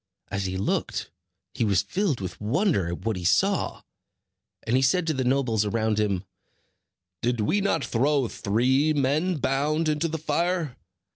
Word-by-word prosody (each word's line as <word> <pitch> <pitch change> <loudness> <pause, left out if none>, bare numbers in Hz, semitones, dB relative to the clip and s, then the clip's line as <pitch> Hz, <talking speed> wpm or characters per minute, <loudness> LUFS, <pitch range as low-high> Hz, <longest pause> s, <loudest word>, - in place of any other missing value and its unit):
As 100 -1 -2
he 95 0 -3
looked, 95 - -2 0.4
he - - -1
was 100 -3 +2
filled 150 - -1
with 95 +1 -6
wonder 135 - +1
at 85 +4 -5
what 110 -4 0
he 90 - -6
saw; 195 - +1 0.8
and 115 - +1
he 130 - +3
said 160 +7 +2
to 160 - 0
the 130 -2 -1
nobles 125 -4 +1
around 110 0 0
him: 100 -4 0 1.0
"Did 120 -1 0
we 200 - +1
not 200 - 0
throw 135 +2 +1
three 130 +10 +1
men 150 +5 +1
bound 150 +4 0
into 155 +2 +1
the 160 0 -3
fire? 160 -1 -1
130 Hz, 160 wpm, -26 LUFS, 105-155 Hz, 1.0 s, he